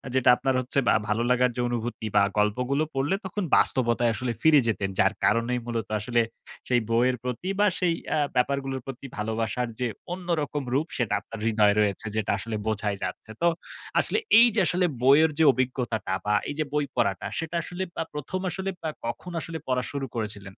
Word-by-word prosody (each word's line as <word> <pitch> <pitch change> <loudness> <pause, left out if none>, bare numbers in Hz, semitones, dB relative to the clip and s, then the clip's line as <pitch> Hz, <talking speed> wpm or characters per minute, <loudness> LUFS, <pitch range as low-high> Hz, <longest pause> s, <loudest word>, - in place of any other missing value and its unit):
যেটা 130 -1 +4
আপনার 135 -1 0
হচ্ছে 130 +2 -1
বা - - +6
ভালো 110 +2 +1
লাগার 125 0 +3
যে 125 - -1
অনুভূতি 120 -1 -3
বা 100 - +6
গল্পগুলো 125 +8 +1
পড়লে 145 +8 +1
তখন 190 +2 -3
বাস্তবতায় 120 -2 +2
আসলে 120 +3 -2
ফিরে 155 -2 +6
যেতেন। 100 -3 0
যার 100 +1 +4
কারণেই 115 +3 +2
মূলত 115 -3 -3
আসলে 120 +1 +1 0.5
সেই 125 -2 +3
বইয়ের 125 +2 +3
প্রতি 125 +9 -3
বা 210 - +5
সেই 175 -2 +2 0.2
আ - - +1 0.2
ব্যাপারগুলোর 135 0 0
প্রতি 135 0 -8
ভালোবাসার 110 +3 -1
যে 125 - +1 0.3
অন্যরকম 160 -5 -2
রূপ 150 +5 +1
সেটা 120 -4 0
আপনার 115 - -9
হৃদয়ে 105 -2 +4
রয়েছে 105 0 0
যেটা 110 - 0
আসলে 110 +3 -5
বোঝাই 105 -1 -1
যাচ্ছে। 95 +4 -5
তো 170 - +4 0.5
আসলে - - +1 0.2
এই 240 - +8
যে - - +3
আসলে 180 0 +2 0.2
বইয়ের 150 +4 +6
যে, 160 - +4
অভিজ্ঞতাটা 120 -6 -1
বা 105 - +2 0.2
এই 145 - -4
যে - - +3
বই 150 -1 +1
পড়াটা 100 -6 0
সেটা 165 +1 -4
আসলে 180 +1 -4 0.2
আব 165 - -4
১ম 150 +6 -3
আসলে 190 +3 -3 0.2
আ - - 0 0.2
কখন 180 +9 -5
আসলে 165 -1 -5
পড়া 125 -1 +1
শুরু 140 -1 -3
করেছিলেন? 105 -3 -4
125 Hz, 185 wpm, -26 LUFS, 110-145 Hz, 0.5 s, এই